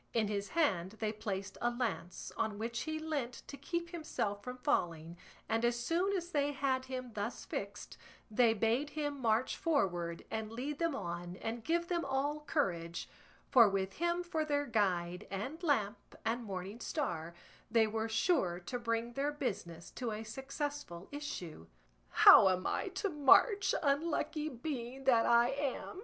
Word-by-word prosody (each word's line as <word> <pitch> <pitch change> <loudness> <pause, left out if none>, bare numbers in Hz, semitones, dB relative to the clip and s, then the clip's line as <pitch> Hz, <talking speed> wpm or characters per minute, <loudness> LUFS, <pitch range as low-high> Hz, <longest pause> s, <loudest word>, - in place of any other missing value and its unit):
In 220 -3 +2
his 200 -1 -2
hand 195 - +1
they 220 -1 -2
placed 195 -2 -4
a 240 - +3
lance, 240 -7 -3
on 220 -2 -1
which 230 +2 -3
he 315 - -1
leant 295 -6 -3
to - - -8
keep 340 +3 -3
himself 215 -11 -3
from 250 0 -6
falling, 170 - 0 0.3
and 225 +1 0
as 240 0 +2
soon 355 +10 +1
as 350 0 -5
they 290 -2 +1
had 260 -2 0
him 255 -1 -5
thus 210 +3 -4
fixed 200 +1 -6 0.3
they 225 0 +4
bade 230 +7 +1
him 290 -2 -3
march 230 +1 +2
forward 175 - 0
and 220 -1 -3
lead 275 +5 -4
them 335 -4 +1
on 175 -4 -4
and 225 +4 -4
give 340 +4 +1
them 345 -1 0
all 280 +2 0
courage; 175 - -1 0.4
for 235 -5 +8
with 195 -1 -1
him 345 +1 0
for 330 -3 -1
their 290 -1 0
guide 180 -7 0
and 235 - -4
lamp 235 - 0
and 235 +2 0
morning 195 +2 -5
star, 170 - -3 0.3
they 225 -1 +4
were 220 +1 -2
sure 220 - +2
to 215 +8 -5
bring 230 0 -1
their 280 +3 0
business 195 - -4
to 245 -3 -3
a 215 +1 -4
successful 270 - -5
issue. 185 - -6 0.4
"How 190 - +9
am 185 0 0
I - - 0
to 380 +2 -2
march, 385 - +5
unlucky 305 +1 0
being 260 -1 -5
that 240 -4 +4
I 235 +1 +5
am?" 280 +5 -3
240 Hz, 165 wpm, -34 LUFS, 205-290 Hz, 0.4 s, How